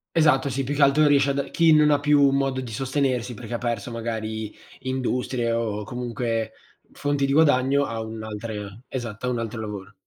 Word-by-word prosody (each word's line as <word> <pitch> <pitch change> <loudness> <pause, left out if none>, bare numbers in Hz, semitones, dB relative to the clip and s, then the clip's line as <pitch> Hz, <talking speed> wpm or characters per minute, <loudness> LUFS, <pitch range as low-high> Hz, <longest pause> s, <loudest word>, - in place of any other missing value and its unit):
Esatto, 145 -4 +4
sì, 135 +1 -2
più 140 +3 -2
che 145 - -1
altro 140 +2 +5
riesci 140 -1 +4
a - - +1
da 140 0 -1
chi 165 -1 +4
non 150 0 +5
ha 145 - +3
più 145 -1 +4
modo 135 -1 0
di 120 -3 -7
sostenersi 130 -1 -1
perché 120 - -8
ha - - 0
perso 120 -1 -3
magari 110 -2 -4 0.3
industrie, 125 -2 -1
o 110 -2 -1
comunque 115 -1 -3 0.4
fonti 145 -1 0
di 135 - 0
guadagno, 140 -2 +4
ha 115 -3 -4
un'altra 110 0 -6 0.3
esatto, 120 -2 -5
ha - - +1
un 125 - -1
altro 115 0 -4
lavoro. 100 -2 -6
125 Hz, 190 wpm, -24 LUFS, 115-140 Hz, 0.4 s, altro